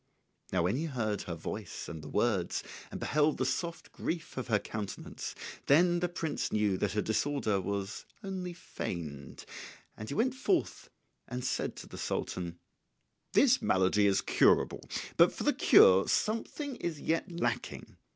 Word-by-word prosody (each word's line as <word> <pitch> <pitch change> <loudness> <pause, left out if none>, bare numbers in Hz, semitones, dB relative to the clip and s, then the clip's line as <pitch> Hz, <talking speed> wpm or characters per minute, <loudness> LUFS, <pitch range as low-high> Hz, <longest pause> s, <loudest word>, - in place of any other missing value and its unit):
Now 90 -2 +2
when 95 +8 +1
he 160 - -1
heard 110 - -1
her 85 - -5
voice 95 +4 -6
and 80 -2 -7
the 75 - -9
words, 105 -5 0 0.3
and - - -6
beheld 150 +1 +2
the 130 - 0
soft 170 +6 -3
grief 165 -1 -4
of 130 - -4
her 110 -3 +3
countenance, 105 -1 -6 0.3
then 175 +4 +5
the 175 0 0
prince 165 -3 -2
knew 105 -2 +2
that 100 -2 0
her 105 - 0
disorder 110 -3 0
was 100 +2 -4 0.2
only 190 -2 -4
feigned; 80 - -6 0.5
and 110 - -7
he 140 - -3
went 250 +6 +2
forth 325 +7 0 0.4
and 125 0 -4
said - - -1
to - - -9
the - - -9
Sultan, 85 -2 -3 0.8
"This - - +5
malady 95 +2 +3
is 95 -1 +3
curable; - - +3 0.4
but - - +7
for - - -5
the - - +3
cure 95 +1 +7
something 245 +5 -1
is 165 -4 -3
yet 165 +4 -1
lacking. 170 0 -3
115 Hz, 160 wpm, -31 LUFS, -, 0.8 s, but